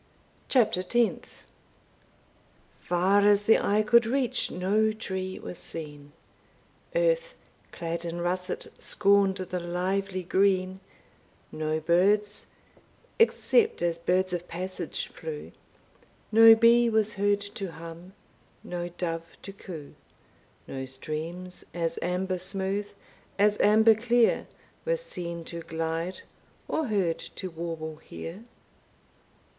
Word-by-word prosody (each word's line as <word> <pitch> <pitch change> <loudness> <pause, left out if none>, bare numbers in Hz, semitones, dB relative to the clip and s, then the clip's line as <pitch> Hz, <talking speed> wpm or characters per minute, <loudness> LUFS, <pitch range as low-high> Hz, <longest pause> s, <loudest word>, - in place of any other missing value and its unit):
CHAPTER 225 -8 +3
TENTH. 235 +5 -1 1.3
Far 185 +3 +2
as 205 0 +5
the 225 - +6
eye 210 +1 +2
could 235 +1 +5
reach 255 0 0
no 210 +4 +1
tree 190 -3 -4
was 180 - -8
seen, 145 -3 -7 0.8
Earth, - - +1 0.4
clad 170 0 -4
in 170 0 -4
russet, 180 +2 -3
scorned 200 -1 +3
the 185 -1 -3
lively 185 +2 -2
green; 190 0 +1 0.7
No 155 0 -1
birds, 200 +6 +2 0.7
except 455 - +3
as 170 -1 0
birds 185 +2 +1
of 175 0 -3
passage 185 +2 -5
flew; 465 -2 -7 0.8
No 225 +1 +9
bee 235 +1 +5
was 220 -1 +2
heard 205 0 +1
to 190 -4 -5
hum, 170 +3 -10 0.5
no 175 0 -4
dove 165 -1 -5
to 195 - -8
coo; 165 -7 -9 0.7
No 130 -1 -5
streams, 160 +7 -6
as 165 -1 -1
amber 180 +1 -1
smooth 195 +2 -1 0.5
as 205 +1 +4
amber 220 +2 +6
clear, 235 +1 +2 0.4
Were - - +1
seen 175 - -6
to 170 0 -7
glide, 165 +2 -3 0.5
or 315 -3 -1
heard 190 -7 0 0.2
to 185 -2 -5
warble 160 -1 -5
here. 175 +6 -9
185 Hz, 110 wpm, -27 LUFS, 170-210 Hz, 1.3 s, No